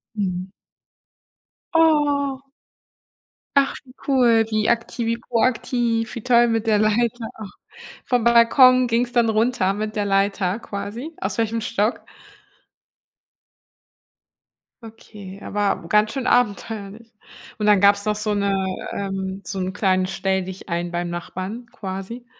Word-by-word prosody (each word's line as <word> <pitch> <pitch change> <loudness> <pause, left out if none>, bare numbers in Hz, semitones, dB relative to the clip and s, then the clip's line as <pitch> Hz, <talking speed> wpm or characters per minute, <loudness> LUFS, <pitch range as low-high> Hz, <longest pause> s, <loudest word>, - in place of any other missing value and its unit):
Mhm. 185 -2 -2 1.3
Oh. 290 -4 +2 1.2
Ach, 275 0 +3
wie 255 - -17 0.2
cool, 235 -4 +4
wie 215 -1 0
akti 235 0 -1
wie 230 0 0
proaktiv 235 -1 0
wie 235 - -5
toll 240 -1 +4
mit 225 0 -1
der 215 - +4
Leiter. 225 +2 0
Och, 205 -3 -8 0.5
vom 245 -3 +1
Balkon 250 +2 +6
ging's 240 +1 0
dann 235 -2 +3
runter 220 -2 +1
mit 215 +1 -4
der 210 - 0
Leiter 195 0 0
quasi 230 +9 -7
aus 190 0 -3
welchem 225 0 -1
Stock? 215 +1 -1 2.8
Okay, 210 -3 -11
aber 200 -4 -2
ganz 210 +3 +3
schön 265 -1 -3
abenteuerlich 220 -1 -1 0.4
und 210 - -2
dann 210 -2 +5
gab's 200 +1 +4
noch 210 0 +1
so 210 0 -1
'ne 200 -1 0 0.4
ähm, 195 -1 -4
so 195 - -5
'n 185 0 -2
kleinen 185 -2 +1
Stelldichein 185 -2 -3
beim 175 0 -3
Nachbarn 185 +6 -6
quasi. 195 +5 -7
215 Hz, 125 wpm, -22 LUFS, 195-235 Hz, 2.8 s, Balkon